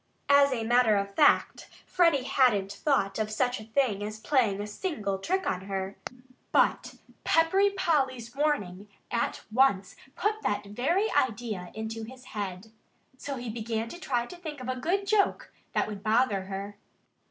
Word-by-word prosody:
As 280 0 +6
a 235 -3 -1
matter 230 -2 +4
of 200 0 -2
fact, 295 +7 +3 0.2
Freddie 335 -7 +3
hadn't 220 -8 +2
thought 200 -3 0
of 215 -1 -1
such 245 +3 0
a 215 - -10
thing 225 -3 0
as 215 +1 -5
playing 225 -5 +1
a 205 - -3
single 210 - -3
trick 375 - -1
on 185 0 -2
her. 195 0 -4 0.6
But - - +2 0.3
Peppery 380 +5 +4
Polly's 270 - -1
warning 210 -10 -1 0.2
at 235 -1 -1
once 215 -7 +2 0.2
put 425 +2 -1
that 205 0 -1
very 305 - 0
idea 215 -7 -1
into 220 +1 -5
his 250 +3 -10
head. 200 0 -5 0.5
So 280 - -4
he 245 -3 -5
began 225 0 -3
to 345 - -9
try 245 -8 -1
to 355 - -11
think 310 -5 -7
of 255 - -7
a 255 - -1
good 360 +10 -1
joke 405 0 +1 0.2
that - - +1
would 205 -2 -6
bother 215 -2 +2
her. 200 +1 -6
235 Hz, 165 wpm, -28 LUFS, 205-280 Hz, 0.6 s, As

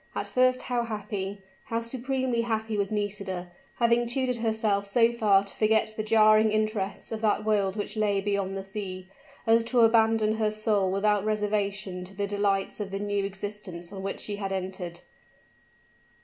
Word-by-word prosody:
At - - -2
first 255 0 +2
how 245 -1 0
happy 205 -3 -4 0.2
how 230 0 -2
supremely 255 0 -1
happy 220 -1 -2
was 200 -1 -1
Nisida, 200 -4 -3 0.2
having 235 0 +3
tutored 250 0 -1
herself 220 -3 0
so 230 +3 +3
far 205 -4 +4
to 200 - -11
forget 220 0 +2
the 215 - -2
jarring 215 0 +5
interests 215 -2 -1
of 220 -1 -4
that 215 -1 +1
world 200 -3 +1
which 210 +2 -4
lay 210 -2 +1
beyond 195 -1 -1
the 195 - -4
sea, 190 -2 -6 0.4
as 225 0 +4
to 240 0 +2
abandon 225 -1 +4
her 215 -1 +1
soul 210 -3 +1
without 205 +1 +2
reservation 205 -3 -1
to 195 +2 -14
the 200 +1 -1
delights 200 -1 0
of 205 -2 -3
the 195 - -3
new 205 0 -1
existence 195 -2 -6
on 195 - -6
which 195 +1 -4
she 205 -1 -4
had 195 -1 -3
entered. 185 -2 -4
210 Hz, 170 wpm, -27 LUFS, 195-220 Hz, 0.4 s, jarring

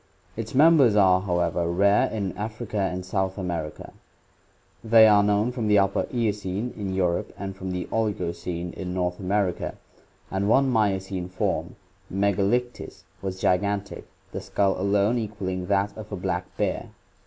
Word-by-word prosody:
Its 115 +2 -6
members 145 -6 +6
are, 95 -3 +5
however, 85 -2 0
rare 100 +4 +3
in 100 -4 -3
Africa 110 0 -4
and 90 0 -5
South 95 0 -1
America. 85 -5 -5 0.9
They 110 -1 +7
are 105 -1 +6
known 105 +3 +2
from 120 -3 -3
the 105 0 +5
Upper 100 0 +2
Eocene 105 -1 -2
in 95 -3 -4
Europe 90 -2 0
and 95 -1 -5
from 95 -1 -6
the 90 -1 -3
Oligocene 90 -5 -2
of 90 - -4
North 90 -1 -2
America, 95 -1 -1 0.6
and 95 +1 0
one 135 +4 +4
Miocene 95 -5 0
form, 90 - -2 0.4
Mcgalictis, 100 +5 -1 0.2
was 95 -1 -4
gigantic, 100 +2 -1 0.2
the - - -5
skull 100 -1 +1
alone 100 +4 +2
equalling 95 -4 -4
that 100 0 +1
of 110 -1 -9
a - - -2
black 90 - -2
bear. - - -1
100 Hz, 145 wpm, -25 LUFS, 95-105 Hz, 0.9 s, They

